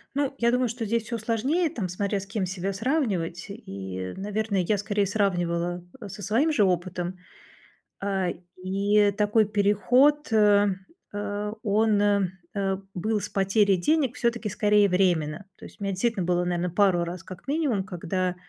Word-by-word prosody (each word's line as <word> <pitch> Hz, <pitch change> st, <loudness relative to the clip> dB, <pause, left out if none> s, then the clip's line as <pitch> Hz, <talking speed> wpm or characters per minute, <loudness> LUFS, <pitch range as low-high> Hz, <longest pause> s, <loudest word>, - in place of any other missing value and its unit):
Ну, 280 Hz, -1 st, 0 dB
я 235 Hz, 0 st, +3 dB
думаю, 250 Hz, 0 st, +1 dB
что 230 Hz, +1 st, -4 dB
здесь 230 Hz, +1 st, 0 dB
всё 235 Hz, 0 st, -4 dB
сложнее, 255 Hz, -, 0 dB
там 205 Hz, -9 st, -3 dB
смотря 200 Hz, +3 st, -1 dB
с 195 Hz, -, -9 dB
кем 195 Hz, -1 st, -2 dB
себя 190 Hz, +1 st, -3 dB
сравнивать. 195 Hz, -, -1 dB
И, 95 Hz, -, -6 dB
наверное, 205 Hz, 0 st, -1 dB
я 205 Hz, +3 st, +1 dB
скорее 205 Hz, 0 st, 0 dB
сравнивала, 175 Hz, -3 st, -1 dB, 0.2 s
э, 205 Hz, -, -7 dB
со 200 Hz, +2 st, -9 dB
своим 235 Hz, -, +2 dB
же 220 Hz, -9 st, +3 dB
опытом. 180 Hz, 0 st, -1 dB, 0.8 s
А, 195 Hz, -2 st, -1 dB, 0.3 s
и 200 Hz, +2 st, +3 dB
такой 210 Hz, +2 st, +3 dB
переход, 225 Hz, +8 st, +3 dB
э, 205 Hz, -2 st, +5 dB, 0.5 s
а, 205 Hz, 0 st, -3 dB
он, 215 Hz, 0 st, +2 dB
э, 200 Hz, -2 st, +3 dB, 0.3 s
э, 195 Hz, -1 st, 0 dB, 0.2 s
был 210 Hz, +4 st, -1 dB
с -, -, -5 dB
потерей 195 Hz, 0 st, +2 dB
денег 275 Hz, -, +1 dB
всё-таки 235 Hz, -2 st, 0 dB
скорее 210 Hz, 0 st, +3 dB
временно. 175 Hz, -3 st, +1 dB
То -, -, -14 dB
есть -, -, -16 dB
у -, -, -4 dB
меня 195 Hz, -, -1 dB
действительно 195 Hz, 0 st, 0 dB
было, 175 Hz, 0 st, +1 dB
наверно, 175 Hz, 0 st, -1 dB
пару 180 Hz, -1 st, +3 dB
раз 175 Hz, +2 st, -6 dB
как 185 Hz, +2 st, -11 dB
минимум, 275 Hz, -9 st, 0 dB
когда 185 Hz, -1 st, -2 dB
200 Hz, 165 wpm, -26 LUFS, 185-220 Hz, 0.8 s, э